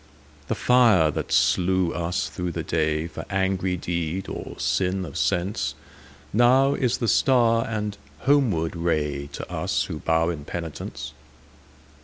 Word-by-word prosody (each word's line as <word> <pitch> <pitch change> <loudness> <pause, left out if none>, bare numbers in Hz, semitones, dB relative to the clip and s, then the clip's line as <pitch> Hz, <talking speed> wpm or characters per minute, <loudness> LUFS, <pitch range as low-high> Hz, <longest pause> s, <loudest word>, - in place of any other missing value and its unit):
The - - -1
fire 115 -11 +4
that - - -4
slew 90 -1 +2
us 85 +1 -1
through 90 -2 -4
the - - -3
dayFor 80 +1 -1
angry 95 -2 0
deed 85 +1 -3
or - - -7
sin 95 0 0
of - - -9
senseNow 105 - 0
is 125 -4 0
the 115 - -2
star 115 +1 +3
and 105 -2 -3 0.2
homeward 125 - +2
rayTo 75 -4 -2
us - - -1
who 75 - -5
bow 80 +1 +1
in 80 -4 -4
penitence. 85 0 -6
90 Hz, 125 wpm, -24 LUFS, 80-110 Hz, 0.2 s, fire